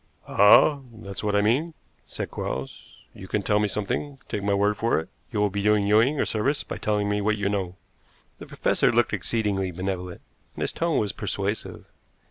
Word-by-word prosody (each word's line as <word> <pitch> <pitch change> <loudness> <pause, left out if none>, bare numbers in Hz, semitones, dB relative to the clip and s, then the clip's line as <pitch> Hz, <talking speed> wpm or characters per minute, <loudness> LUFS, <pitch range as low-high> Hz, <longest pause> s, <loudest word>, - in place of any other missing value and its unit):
"Ah, 105 +8 +6 0.2
that 100 - -9
is 100 - -5
what 105 -1 0
I 105 - +4
mean," 145 +10 +1 0.3
said - - -6
Quarles. 65 0 -6
"You 95 - -10
can 105 +1 -1
tell 105 +1 +2
me 105 - +2
something. 105 +8 -3
Take 105 - -3
my 100 0 +1
word 105 +1 +2
for 115 +3 +1
it, 80 +3 -8 0.2
you 110 - -2
will 105 -1 +2
be 100 +1 -2
doing 105 0 +3
Ewing 115 +8 +3
a - - +2
service 135 +7 0
by - - -6
telling 105 -1 0
me 105 0 0
what 110 +1 +1
you 100 -1 -1
know." 95 -3 -2 0.6
The - - -10
professor - - +1
looked - - +2
exceedingly 100 -5 -1
benevolent, 90 0 -4 0.3
and - - -7
his - - -2
tone 165 -2 0
was 105 -2 0
persuasive. 100 0 -4
105 Hz, 200 wpm, -25 LUFS, 100-110 Hz, 0.6 s, Ah